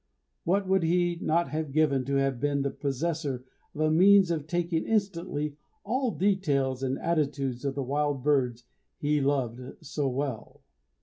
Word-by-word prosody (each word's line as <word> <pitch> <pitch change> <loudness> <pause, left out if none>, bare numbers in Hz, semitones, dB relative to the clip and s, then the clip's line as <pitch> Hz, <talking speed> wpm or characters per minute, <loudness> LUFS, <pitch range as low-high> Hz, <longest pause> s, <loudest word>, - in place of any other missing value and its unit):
What 195 +3 +1
would 190 0 +3
he 175 +1 +1
not 170 -1 +1
have 155 0 -3
given 140 -3 +2
to 140 +1 -1
have 135 -2 +1
been 140 +1 0
the 140 - -1
possessor 140 -2 -2 0.3
of 155 - -3
a 155 0 +3
means 190 +2 +6
of 155 -3 -2
taking 170 0 0
instantly 170 -8 -1 0.3
all 255 0 0
the 200 -1 +2
details 140 -8 -1
and 135 0 -1
attitudes 140 -6 -1
of 135 -1 -1
the 140 - -2
wild 145 0 -1
birds 125 -5 +1 0.3
he 150 0 +1
loved 130 -2 -2
so 145 -2 -1
well! 130 -3 -4
145 Hz, 165 wpm, -28 LUFS, 135-170 Hz, 0.3 s, means